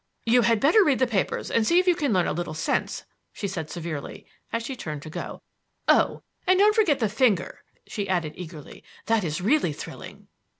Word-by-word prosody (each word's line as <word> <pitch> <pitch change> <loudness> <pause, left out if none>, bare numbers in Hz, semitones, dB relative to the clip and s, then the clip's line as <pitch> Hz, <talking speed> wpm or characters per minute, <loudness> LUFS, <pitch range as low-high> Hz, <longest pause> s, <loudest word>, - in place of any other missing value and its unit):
"You 240 +2 +5
had 230 -1 +3
better 325 - +5
read 280 -7 +3
the 260 - +3
papers 220 -6 -1
and 230 - +3
see 340 - +4
if 365 - +4
you 360 - +5
can 290 -6 0
learn 185 -4 +2
a - - -1
little 170 -1 -4
sense," - - -1 0.3
she 200 - -4
said 165 -5 -5
severely 160 -4 -6 0.3
as 230 0 -2
she 265 - -4
turned 155 - -6
to 155 - -9
go. - - -7 0.4
"Oh, - - +3 0.2
and 370 0 +5
don't 415 +2 +5
forget 405 - +3
the 230 -5 +1
finger!" 210 -3 +1 0.3
she 200 -2 -4
added 170 -5 0
eagerly. 160 -4 -10 0.2
"That 225 -2 +2
is 155 0 -2
really 215 - +2
thrilling." - - -10
215 Hz, 205 wpm, -25 LUFS, 170-275 Hz, 0.4 s, You